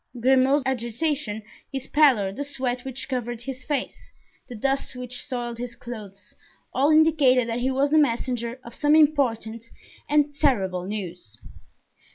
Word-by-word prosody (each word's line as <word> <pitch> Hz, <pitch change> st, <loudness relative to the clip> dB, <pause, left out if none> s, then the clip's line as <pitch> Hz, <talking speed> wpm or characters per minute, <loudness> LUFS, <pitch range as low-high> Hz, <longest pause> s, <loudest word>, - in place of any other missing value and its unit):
Grimaud's 265 Hz, +3 st, +4 dB
agitation, 240 Hz, -2 st, -2 dB, 0.3 s
his 270 Hz, -2 st, -4 dB
pallor, 260 Hz, -11 st, +4 dB
the 280 Hz, +9 st, -4 dB
sweat 260 Hz, -3 st, -3 dB
which 265 Hz, 0 st, -6 dB
covered 240 Hz, -3 st, -3 dB
his 260 Hz, -1 st, -6 dB
face, 280 Hz, -2 st, -4 dB, 0.4 s
the 245 Hz, -, -7 dB
dust 270 Hz, +3 st, -1 dB
which 250 Hz, 0 st, -6 dB
soiled 240 Hz, -2 st, -4 dB
his 240 Hz, -1 st, -5 dB
clothes, 210 Hz, -5 st, -10 dB, 0.4 s
all 275 Hz, +3 st, +3 dB
indicated 300 Hz, -6 st, +4 dB
that 230 Hz, +1 st, -2 dB
he 255 Hz, +2 st, 0 dB
was 275 Hz, +2 st, +1 dB
the 310 Hz, -, +5 dB
messenger 240 Hz, -2 st, 0 dB
of 235 Hz, -, -11 dB
some 295 Hz, +3 st, +3 dB
important 230 Hz, -7 st, +2 dB, 0.4 s
and 295 Hz, 0 st, +3 dB
terrible 190 Hz, -12 st, +1 dB
news. 180 Hz, -, -6 dB
250 Hz, 145 wpm, -25 LUFS, 230-280 Hz, 0.4 s, the